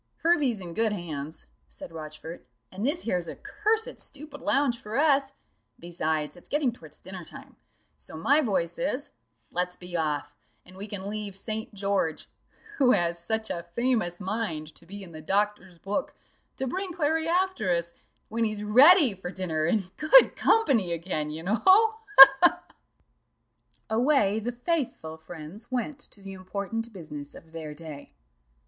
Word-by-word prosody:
"Hervey's 295 - +2
in 175 -3 -8
good 220 +2 +1
hands," 160 -5 -6 0.2
said - - -11
Rochfort, 155 -1 -9 0.2
"and 195 +3 -6
this 300 +8 -1
here's 180 -6 -1
a - - -6
cursed 435 +3 -1
stupid 290 0 -8
lounge 270 -4 +1
for 215 +3 -5
us 280 -2 +3 0.4
besides, 160 -3 -2
it's 175 - -13
getting 290 -4 +1
towards 160 -10 -14
dinner 185 -1 -9
time; - - -12 0.4
so 160 - -10
my 285 - +3
voice 180 - -1
is, 275 +1 -2 0.4
let's 180 +1 -2
be 180 -1 -9
off, 145 -3 -2 0.3
and 185 - -15
we 200 +2 -6
can 200 -2 -6
leave 205 -1 -4
St. 220 +2 -4
George 195 -5 -1 0.5
(who 255 -2 +5
has 170 0 0
such 220 +4 -2
a 170 -1 -5
famous 235 -8 0
mind 185 -7 -3
to 170 - -17
be 200 +2 -8
in 180 - -12
the 155 -1 -9
doctor's 195 0 -1
book) 200 +9 -3 0.4
to 265 - -2
bring 375 +8 -3
Clary 320 -1 0
after 360 - 0
us, 170 -1 0 0.3
when 230 +1 -1
he's 215 -2 -2
ready 270 - +7
for 185 -2 -7
dinner 165 -5 -2
and 185 +1 -1
good 315 +12 +6
company 245 - +2
again, 165 -3 -3
you 155 +2 -6
know 205 +6 0
ha! 440 +4 +5 0.2
ha! 270 - +15
ha!" 350 - +4 1.2
Away 220 -3 +2
the 235 +3 -3
faithful 245 - -3
friends 160 +5 -10
went 260 +3 -3
to 200 -8 -14
the 195 0 -8
important 200 +5 -5
business 150 -7 -9
of 165 - -14
their 155 -2 -7
day. 150 - -10
200 Hz, 160 wpm, -27 LUFS, 170-265 Hz, 1.2 s, ha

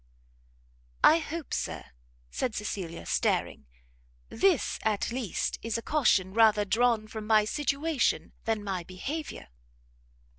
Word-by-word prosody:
"I 320 - +7
hope, 325 -1 -6
Sir," - - -3 0.5
said 245 -4 -2
Cecilia, 185 -5 -5
staring, 70 - 0 0.6
"this 345 +4 +1
at 215 -1 0
least 240 -5 -2
is 230 0 -2
a 230 - -6
caution 200 -11 +2
rather 215 -2 +5
drawn 225 +2 +2
from 215 -1 -7
my 215 -1 +5
situation 290 +3 0
than 220 -2 -1
my 190 -3 -3
behaviour?" 270 - -6
225 Hz, 115 wpm, -29 LUFS, 205-275 Hz, 0.6 s, I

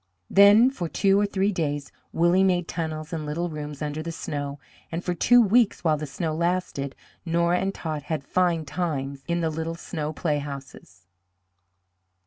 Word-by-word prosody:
Then 205 +6 +7
for 175 -11 -4
two 195 +3 +3
or 205 - +2
three 200 0 +1
days 145 -6 -2 0.2
Willie 175 +3 +3
made 180 -2 +2
tunnels 160 -1 -4
and 160 -2 -3
little 165 +4 -2
rooms 150 -1 -6
under 150 +1 -3
the 165 +1 -4
snow, 145 -3 -4 0.3
and 165 +2 -3
for 180 - -1
two 245 +8 +5
weeks, 230 0 +3
while 160 -3 +3
the 150 0 -5
snow 155 +3 -3
lasted, 170 -5 -1 0.3
Nora 170 +1 +2
and 195 - 0
Tot 155 -5 -4
had 155 -4 -1
fine 170 0 +1
times 140 -3 -3
in 170 0 0
the 160 -1 0
little 160 +1 -3
snow 155 -3 -4
playhouses. 140 - -5
165 Hz, 165 wpm, -25 LUFS, 150-180 Hz, 0.3 s, Then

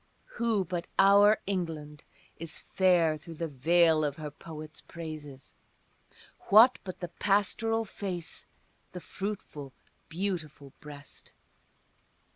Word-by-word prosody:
Who 225 -5 +1
but 175 0 -4
our 205 +2 +7
England 160 -6 -4 0.3
is 165 0 -5
fair 175 -5 +2
through 165 +2 -10
the 165 +1 -3
veil 160 +3 +3
of 145 -2 -1
her 150 -1 -6
poets' 155 +1 -10
praises, 155 -5 -9 1.0
What 225 +5 +8
but 185 -1 -8
the 175 - -4
pastoral 225 +3 +1
face, 185 -4 -4 0.5
the 180 - -5
fruitful, 175 -9 -6 0.4
beautiful 160 -6 -4
breast? 145 -1 -11
170 Hz, 105 wpm, -30 LUFS, 150-195 Hz, 1.0 s, What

